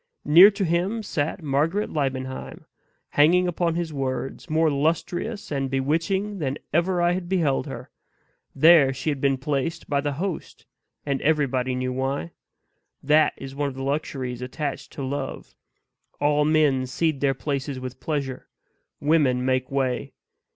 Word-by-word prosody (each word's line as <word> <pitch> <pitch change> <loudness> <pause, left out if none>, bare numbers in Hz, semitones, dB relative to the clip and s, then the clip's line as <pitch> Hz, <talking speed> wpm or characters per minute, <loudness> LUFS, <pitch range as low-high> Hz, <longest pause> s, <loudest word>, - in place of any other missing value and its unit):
near 170 +7 +9
to 200 -1 -2
him 180 +7 0
sat 160 0 -2
Margaret 155 +8 0
Liebenheim 130 -3 -3 0.4
hanging 175 +5 +4
upon 170 -1 0
his 170 -2 -3
words 135 +3 -4
more 160 0 +3
lustrous 170 +9 -1
and 135 -2 -1
bewitching 165 +10 -1
than 140 -3 -2 0.2
ever 175 +2 +2
I 175 - +4
had 175 -1 -3
beheld 165 -8 +1
her. - - -8 0.6
There 150 -2 +6
she 135 +4 -2
had 140 -2 -4
been 135 -1 +2
placed 150 +4 -2
by 140 -1 +1
the 145 0 -2
host; 180 +4 -5 0.4
and 140 -2 -1
everybody 135 -4 +1
knew 130 0 -2
why. 130 -9 -2 0.7
That 150 +1 +4
is 135 0 -8
one 140 0 -1
of 130 - -9
the 135 - -5
luxuries 135 -3 -3
attached 140 +3 -4
to 140 - -5
love; 140 +2 -5 0.7
all 150 0 +2
men 150 -4 +3
cede 155 +2 -1
their 135 -1 +2
places 140 -1 -3
with 130 0 -7
pleasure; 140 -4 -3 0.5
women 145 -5 +2
make 130 0 0
way. 135 0 -1
145 Hz, 150 wpm, -24 LUFS, 135-165 Hz, 0.7 s, near